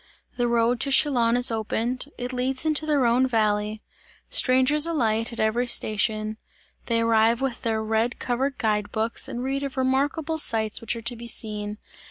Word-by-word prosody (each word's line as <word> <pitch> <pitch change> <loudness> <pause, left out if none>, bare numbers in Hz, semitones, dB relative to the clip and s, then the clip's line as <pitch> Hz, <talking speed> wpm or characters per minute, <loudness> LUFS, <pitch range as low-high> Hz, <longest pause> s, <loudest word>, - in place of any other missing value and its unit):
The 245 -1 0
railroad 235 0 +1
to 275 - +1
Chillon 245 -4 +3
is 245 -1 +3
opened; 225 +3 -2
it 250 +1 -5
leads 255 +3 -1
into 310 0 0
the 300 -1 +2
Rhone 250 0 +3
valley; 215 -2 0 0.5
strangers 260 +4 +3
alight 230 -8 0
at 235 - -7
every 225 +3 +1
station; 215 -1 +1 0.5
they 230 -1 +1
arrive 230 0 +3
with 265 -3 -3
their 220 -3 -1
red 225 +2 0
covered 260 +2 -2
guide 210 -2 -1
books 225 +1 0
and 245 - -5
read 270 +1 -2
of 275 -1 -5
remarkable 285 +5 0
sights 220 -6 0
which 230 +1 -2
are 230 - -8
to 240 +1 -1
be 235 +1 -9
seen. 210 -2 -2
235 Hz, 175 wpm, -24 LUFS, 220-260 Hz, 0.5 s, Chillon